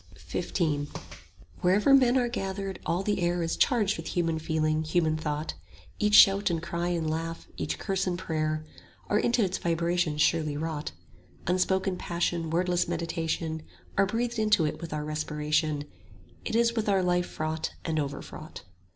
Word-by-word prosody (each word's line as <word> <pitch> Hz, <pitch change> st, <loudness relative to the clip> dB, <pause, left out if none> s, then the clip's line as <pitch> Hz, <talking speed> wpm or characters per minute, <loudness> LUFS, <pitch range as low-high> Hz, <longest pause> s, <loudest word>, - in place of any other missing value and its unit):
90 -, -, +1 dB, 0.4 s
XV 145 Hz, -, -15 dB, 0.7 s
Wherever 205 Hz, +9 st, +4 dB
men 260 Hz, -2 st, +6 dB
are 245 Hz, -1 st, +2 dB
gathered, 195 Hz, -4 st, -4 dB
all 175 Hz, +3 st, 0 dB
the 205 Hz, -2 st, 0 dB
air 175 Hz, 0 st, +1 dB
Is 165 Hz, -, -1 dB
charged 215 Hz, -6 st, +2 dB
with 165 Hz, -, -6 dB
human 165 Hz, -2 st, +1 dB
feeling, 155 Hz, 0 st, 0 dB
human 160 Hz, -1 st, +1 dB
thought; 150 Hz, 0 st, -3 dB, 0.5 s
Each 210 Hz, 0 st, +3 dB
shout 200 Hz, 0 st, +7 dB
and 170 Hz, -2 st, 0 dB
cry 170 Hz, +1 st, -3 dB
and 170 Hz, -3 st, -1 dB
laugh, 165 Hz, +1 st, -3 dB
each -, -, -3 dB
curse 195 Hz, -1 st, -1 dB
and 175 Hz, -1 st, 0 dB
prayer, 155 Hz, -3 st, -2 dB, 0.4 s
Are 210 Hz, -, +3 dB
into 240 Hz, 0 st, +2 dB
its 190 Hz, -1 st, -1 dB
vibrations 170 Hz, -2 st, 0 dB
surely 155 Hz, -3 st, +1 dB
wrought; 155 Hz, -, -3 dB, 0.5 s
Unspoken 185 Hz, +1 st, +1 dB
passion, 170 Hz, -1 st, -1 dB
wordless 175 Hz, +1 st, +1 dB
meditation, 165 Hz, -1 st, -2 dB, 0.4 s
5 -, -, -2 dB
Are 195 Hz, -, +6 dB
breathed 235 Hz, +3 st, -1 dB
into 215 Hz, -6 st, +3 dB
it 150 Hz, -, -3 dB
with 170 Hz, -, -6 dB
our 150 Hz, 0 st, -3 dB
respiration 150 Hz, 0 st, -1 dB, 0.6 s
It -, -, -2 dB
is 235 Hz, 0 st, +3 dB
with 220 Hz, -3 st, -1 dB
our 195 Hz, -2 st, +3 dB
life 180 Hz, 0 st, +1 dB
fraught 155 Hz, 0 st, -3 dB
and 160 Hz, -2 st, 0 dB
overfraught. 140 Hz, -1 st, -6 dB
170 Hz, 165 wpm, -28 LUFS, 155-195 Hz, 0.7 s, shout